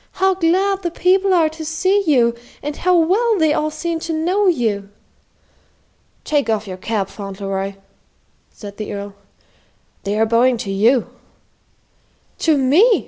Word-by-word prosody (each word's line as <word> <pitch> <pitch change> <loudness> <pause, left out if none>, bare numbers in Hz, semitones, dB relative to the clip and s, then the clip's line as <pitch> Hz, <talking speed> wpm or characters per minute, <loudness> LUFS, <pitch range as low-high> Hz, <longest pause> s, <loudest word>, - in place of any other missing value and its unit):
"How 380 +1 +2
glad 380 +3 +1
the 350 - -2
people 380 +3 +2
are 340 -4 +4
to 320 +1 -9
see 370 +6 +1
you, 240 -6 +3 0.3
and 295 0 -4
how 365 0 +2
well 410 +7 +2
they 315 -3 +3
all 305 0 0
seem 330 +2 -3
to 325 0 -4
know 365 +6 +1
you!" 220 - 0 1.3
"Take 290 -6 0
off 215 -1 0
your 190 -2 -6
cap, 205 0 -2
Fauntleroy," 195 -1 -5 0.7
said 205 -2 -11
the 215 - -5
Earl. 200 0 -6 0.9
"They 200 +1 -2
are 220 - +3
bowing 235 +2 +3
to 220 -4 -5
you." 225 +6 +2 1.3
"To 315 -3 +2
me!" 325 - +4
300 Hz, 145 wpm, -19 LUFS, 215-360 Hz, 1.3 s, are